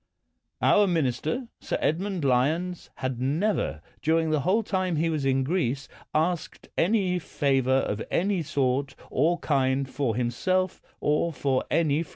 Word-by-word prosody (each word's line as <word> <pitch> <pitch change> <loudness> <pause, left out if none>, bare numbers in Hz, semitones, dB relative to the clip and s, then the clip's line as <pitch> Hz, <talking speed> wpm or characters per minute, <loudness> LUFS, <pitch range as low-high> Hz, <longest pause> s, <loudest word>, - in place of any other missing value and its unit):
Our 205 -1 +5
minister, 160 - 0
Sir - - -2
Edmund 180 0 -1
Lyons, 155 +8 +1
had 130 -2 -3
never, 150 - 0 0.2
during 160 0 +2
the 155 - +2
whole 190 - +2
time 185 -4 -1
he 165 +2 +1
was 150 -3 -1
in 135 0 +2
Greece, 135 -4 -1 0.2
asked 165 +2 -1
any 185 -1 +2
favor 135 -5 0
of 105 +1 -2
any 190 0 +1
sort 135 -2 0 0.2
or 165 +6 +2
kind 135 -3 +1
for 130 -4 -1
himself 185 +11 0 0.2
or 150 +3 +1
for 135 -3 0
any 155 -2 +2
friend. 170 - -7
155 Hz, 145 wpm, -26 LUFS, 135-180 Hz, 0.2 s, Our